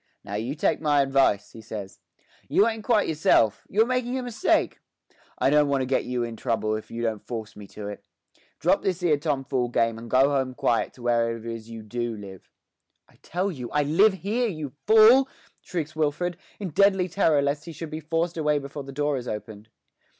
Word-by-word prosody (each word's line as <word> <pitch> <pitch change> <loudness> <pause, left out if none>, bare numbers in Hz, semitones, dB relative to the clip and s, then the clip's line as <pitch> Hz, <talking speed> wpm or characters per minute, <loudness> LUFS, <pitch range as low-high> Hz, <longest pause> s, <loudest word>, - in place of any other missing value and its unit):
'Now 100 - -8
you 115 +7 -2
take 155 - 0
my 145 -2 +3
advice,' 135 -7 +2
he 115 - -11
says. 105 -3 -8 0.5
'You 205 - +4
ain't 220 -1 -3
quite 220 -2 +2
yourself; 130 -9 +2
you're 220 +3 +3
making 250 0 -1
a 255 - -3
mistake. 245 - +1 0.6
I 135 - +2
don't 150 0 +4
want 135 -2 +1
to - - -2
get 130 +1 0
you 125 -1 -1
in 115 -1 -5
trouble 110 -1 -1
if 110 - -7
you 115 0 -5
don't 110 -3 -2
force 110 -2 -6
me 105 -1 -10
to 105 +1 -8
it. 105 -1 -8 0.5
Drop - - +2
this 185 -1 -2
'ere 155 -4 +3
tomfool 135 -4 -1
game 115 -1 +1
and 115 0 -10
go 135 +4 +4
home 130 -2 -1
quiet 115 -2 0
to 125 - -14
wherever 115 -1 +1
it 115 - -12
is 115 -1 -6
you 115 -1 -8
do 120 +1 -3
live.' 95 -3 -11 0.6
'I - - -24
tell 185 +4 -2
you 125 -7 -7
I 150 - +1
live 190 +9 +4
here, 210 +7 -1
you 155 - -5 0.2
fool!' 230 +5 +7 0.3
shrieks 155 -4 -4
Wilfred, 160 +3 -1 0.2
in 195 -3 -4
deadly 190 +2 +3
terror 160 -5 +2
lest 145 +1 -1
he 170 - -7
should 160 0 -7
be 155 - -4
forced 165 +2 -2
away 150 -2 +2
before 140 0 -6
the 135 - -9
door 145 0 0
is 125 -1 -6
opened. 105 0 -7
140 Hz, 210 wpm, -25 LUFS, 115-170 Hz, 0.6 s, fool